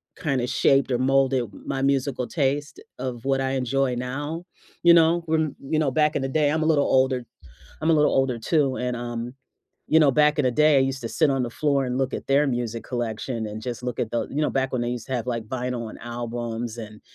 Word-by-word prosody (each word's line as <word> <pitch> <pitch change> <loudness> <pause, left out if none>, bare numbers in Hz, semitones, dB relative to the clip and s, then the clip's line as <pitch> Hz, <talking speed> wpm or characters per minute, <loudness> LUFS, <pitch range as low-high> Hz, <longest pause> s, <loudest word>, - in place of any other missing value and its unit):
kinda 135 -5 -1
shaped, 135 +2 +2
or 120 - +1
molded, 135 -2 +2 0.2
my 135 - -2
musical 135 -2 0
taste 145 -1 -1 0.2
of 125 -2 -5
what 135 0 +1
I 130 0 -1
enjoy 130 0 0
now, 145 +7 -4 0.4
you 170 0 +8
know? 170 0 +4
When 160 -2 0
you 155 +3 -1
know, 150 -3 +2
back 150 +2 +2
in - - 0
the 135 - -2
day 150 +1 +2
I'm 160 - 0
a - - 0
little 145 -3 +3
older 130 -2 +2 0.6
I'm 160 +1 +1
a - - +5
little 150 -1 +3
older, 135 -3 +1
too, 135 +2 +1
and, 125 0 -2
um, 120 +1 -5 0.5
you 160 - +5
know, 150 -3 +5
back 150 +2 +3
in 145 - +2
the 130 - +3
day, 150 +3 +4
I - - +5
used 135 0 -1
to 115 - -3
sit 155 +3 +2
on 135 -2 +1
the 120 - -3
floor 140 +1 +1
and 125 +1 -2
look 135 -1 -1
at - - -5
their 140 +2 +3
music 120 -3 -2
collection, 115 -1 -3
and 105 +1 -6
just 125 -1 -5
look 125 -2 -4
at 110 - -2
the 120 - -2
you 150 +3 -1
know, - - +1
back 135 -1 0
when 125 -2 -1
they 120 - -1
used 120 -2 -5
to 130 - -3
have, 120 -1 -2
like, 115 -2 -2
vinyl, 125 -1 -3
and - - -11
albums, 120 -1 -4
and 110 -2 -9
130 Hz, 240 wpm, -24 LUFS, 120-145 Hz, 0.6 s, you